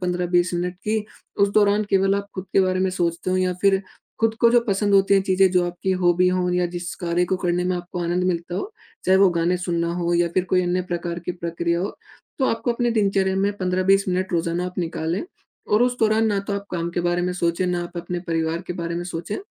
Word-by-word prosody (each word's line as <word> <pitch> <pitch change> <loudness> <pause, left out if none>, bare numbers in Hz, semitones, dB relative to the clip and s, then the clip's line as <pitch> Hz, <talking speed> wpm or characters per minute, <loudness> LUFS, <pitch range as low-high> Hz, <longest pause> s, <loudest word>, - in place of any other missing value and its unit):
15-20 180 -1 +1
minute 175 +1 -2
कि 215 0 0 0.4
उस 200 - +5
दौरान 210 0 +4
केवल 195 0 +3
आप 200 0 -2
खुद 185 - -5
के - - +5
बारे 185 0 +1
में 190 0 +1
सोचते 175 0 -1
हो 185 - +2
या 185 -1 +1
फ़िर 195 -1 +4 0.4
खुद 225 0 +2
को 235 - +6
जो 240 0 +5
पसंद 200 0 +2
होती 195 0 +5
हैं 195 - +4
चीज़ें 190 0 +3
जो 180 -1 +2
आपकी 175 +2 -3
हॉबी 175 +1 +4
हो 180 0 0
या 180 0 +1
जिस 175 0 -4
कार्य 175 -1 0
को 185 +1 -1
करने 180 0 0
में 180 0 0
आपको 175 0 -6
आनंद 175 +2 0
मिलता 175 -1 -2
हो। 390 - -4 0.3
चाहे 190 +1 +4
वो 195 0 +6
गाने 170 +1 +1
सुनना 170 -2 -1
हो 175 -1 -1
या 170 0 +2
फ़िर 185 - +2
कोई 185 0 +3
अन्य 180 +1 0
प्रकार 170 0 -3
की 180 - -1
प्रक्रिया 170 0 -2
हो। 195 - -4 0.4
तो 265 - +2
आपको 230 +1 0
अपने 240 0 0
दिनचर्या 195 -3 +1
में 200 +1 +1
15-20 185 +1 +2
मिनट 185 +1 -1
रोज़ाना 170 +1 0
आप 180 - -7
निकालें। 165 0 -2 0.5
और 210 +3 +5
उस 250 0 +1
दौरान 220 0 +3
ना 205 -2 +1
तो - - -2
आप 200 0 -3
काम 170 -1 -2
के 175 - -2
बारे 175 0 0
में 180 0 -1
सोचें, 175 0 0
ना 175 -1 -1
आप 175 0 -9
अपने 175 +1 -3
परिवार 165 +1 -1
के - - -3
बारे 170 -1 -4
में 175 - -3
सोचें 175 +2 -4
180 Hz, 240 wpm, -23 LUFS, 175-195 Hz, 0.5 s, को